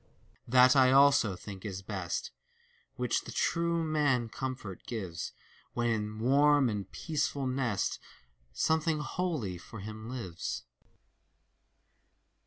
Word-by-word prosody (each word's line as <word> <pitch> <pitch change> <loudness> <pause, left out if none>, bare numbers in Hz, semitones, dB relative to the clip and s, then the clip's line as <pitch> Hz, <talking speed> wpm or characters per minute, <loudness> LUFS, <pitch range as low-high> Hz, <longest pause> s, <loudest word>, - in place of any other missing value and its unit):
That 125 +2 +6
I 130 -1 +6
also 135 -7 +5
think 95 0 -9
is 95 -3 -5
best, 95 -4 -3 0.6
Which - - 0
the - - -7
true 170 0 +1
man 145 -7 +1
comfort 130 -7 -5
gives, 95 -8 -4 0.4
When 120 -1 +1
in 105 -1 -2
warm 140 +3 +4
and 100 -3 -4
peaceful 150 -3 -2
nest 130 -5 -1 0.5
Something 160 - +1
holy 150 - -2
for 110 +4 -10
him 110 +2 -7
lives. 95 -10 -4
125 Hz, 110 wpm, -31 LUFS, 105-140 Hz, 0.6 s, That